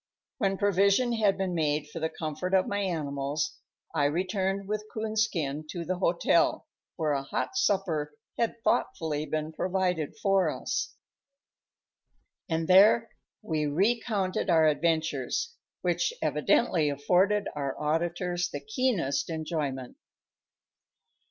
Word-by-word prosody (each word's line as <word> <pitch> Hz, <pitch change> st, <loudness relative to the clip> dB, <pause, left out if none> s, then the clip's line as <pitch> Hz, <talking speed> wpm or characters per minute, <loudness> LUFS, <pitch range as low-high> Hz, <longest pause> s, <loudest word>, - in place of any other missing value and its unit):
When 195 Hz, -2 st, +1 dB
provision 200 Hz, +5 st, +3 dB
had 210 Hz, -4 st, +2 dB
been 190 Hz, -2 st, -1 dB
made 150 Hz, -2 st, 0 dB
for 160 Hz, +3 st, -7 dB
the 160 Hz, 0 st, -1 dB
comfort 160 Hz, +5 st, -2 dB
of 185 Hz, -, +4 dB
my 205 Hz, -, -1 dB
animals, 150 Hz, -5 st, -2 dB, 0.3 s
I 145 Hz, -3 st, +2 dB
returned 190 Hz, +5 st, -1 dB
with 210 Hz, +1 st, -3 dB
Coonskin 210 Hz, -10 st, -1 dB
to 170 Hz, 0 st, -5 dB
the 180 Hz, +1 st, -2 dB
hotel, 170 Hz, -1 st, +2 dB, 0.3 s
where 155 Hz, -2 st, 0 dB
a 140 Hz, -1 st, 0 dB
hot 140 Hz, -, -3 dB
supper 175 Hz, -, 0 dB, 0.2 s
had 230 Hz, 0 st, -2 dB
thoughtfully 155 Hz, -2 st, 0 dB
been 155 Hz, 0 st, -3 dB
provided 180 Hz, -4 st, -1 dB
for 195 Hz, -2 st, +2 dB
us. -, -, -3 dB, 1.5 s
And 165 Hz, 0 st, -1 dB
there 210 Hz, +5 st, +6 dB, 0.3 s
we 155 Hz, -6 st, -1 dB
recounted 195 Hz, +3 st, 0 dB
our 160 Hz, -2 st, +5 dB
adventures, 160 Hz, -, 0 dB, 0.3 s
which -, -, +1 dB
evidently 165 Hz, -10 st, +2 dB
afforded 185 Hz, +9 st, +2 dB
our 140 Hz, -2 st, -3 dB
auditors 175 Hz, +3 st, -1 dB
the 145 Hz, -, -5 dB
keenest 215 Hz, -, 0 dB
enjoyment. 150 Hz, -6 st, -3 dB
175 Hz, 120 wpm, -28 LUFS, 155-195 Hz, 1.5 s, there